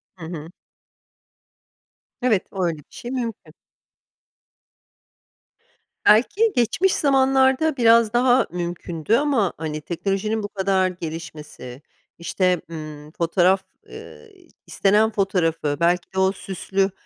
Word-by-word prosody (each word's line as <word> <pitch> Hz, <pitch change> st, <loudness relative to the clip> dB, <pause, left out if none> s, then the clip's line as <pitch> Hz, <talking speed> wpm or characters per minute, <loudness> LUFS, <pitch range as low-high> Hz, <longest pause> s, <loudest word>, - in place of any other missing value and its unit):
Hı 175 Hz, -3 st, -10 dB
hı. 160 Hz, -1 st, -7 dB, 1.7 s
Evet, 230 Hz, -6 st, +1 dB
o 190 Hz, -2 st, -3 dB
öyle 170 Hz, -2 st, -1 dB
bir 150 Hz, -, -14 dB
şey 240 Hz, -, -8 dB
mümkün. 235 Hz, -4 st, -5 dB, 2.5 s
Belki 400 Hz, -, +4 dB
geçmiş 335 Hz, -, +2 dB
zamanlarda 270 Hz, +1 st, +2 dB
biraz 230 Hz, -2 st, +4 dB
daha 250 Hz, +1 st, +3 dB
mümkündü 175 Hz, +1 st, -2 dB
ama, 265 Hz, -8 st, +1 dB
hani, 155 Hz, -1 st, -4 dB
teknolojinin 195 Hz, +6 st, -2 dB
bu -, -, -3 dB
kadar 195 Hz, -2 st, +1 dB
gelişmesi, 155 Hz, -7 st, -8 dB, 0.4 s
işte, 180 Hz, 0 st, 0 dB
emm, 155 Hz, -2 st, -9 dB
fotoğraf 180 Hz, +3 st, +2 dB, 0.3 s
ııı, 455 Hz, -, -12 dB, 0.4 s
istenen 210 Hz, +2 st, +2 dB
fotoğrafı, 165 Hz, -8 st, 0 dB
belki 175 Hz, +2 st, +1 dB
de 190 Hz, -, -1 dB
o 190 Hz, 0 st, +3 dB
süslü, 195 Hz, 0 st, -2 dB
190 Hz, 105 wpm, -22 LUFS, 170-230 Hz, 2.5 s, Belki